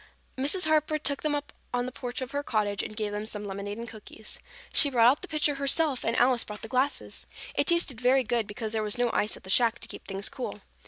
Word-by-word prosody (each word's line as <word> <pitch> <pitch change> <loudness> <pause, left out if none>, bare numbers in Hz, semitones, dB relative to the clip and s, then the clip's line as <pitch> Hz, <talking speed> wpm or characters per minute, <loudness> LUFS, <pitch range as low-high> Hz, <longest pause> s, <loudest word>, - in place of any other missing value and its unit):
Mrs. 290 +8 +2
Harper 310 0 +2
took 285 -2 +1
them 300 -1 +1
up 290 0 -4 0.2
on 245 0 0
the 255 - -4
porch 245 0 -5
of 255 - -4
her 285 - -1
cottage 210 -6 0
and 215 - -7
gave 210 -2 -1
them 210 +1 -3
some 210 -2 -4
lemonade 200 +1 -4
and 235 +1 -6
cookies. 215 -1 -7 0.3
She 290 - +5
brought 235 -3 +5
out 285 - -2
the 375 - -6
pitcher 300 -2 +1
herself 280 0 +3
and 230 - 0
Alice 245 -1 +4
brought 210 -1 -9
the - - -4
glasses. 260 +5 -1 0.3
It - - +1
tasted 340 -9 +3
very 260 +1 +4
good 230 -2 0
because 215 +1 -4
there 220 - +1
was 210 +1 -1
no 245 -1 +2
ice 210 - +1
at - - -16
the 190 - -6
shack 235 +1 +4
to - - -8
keep - - -9
things 195 +1 -2
cool. 260 -3 -5
245 Hz, 250 wpm, -28 LUFS, 215-280 Hz, 0.3 s, She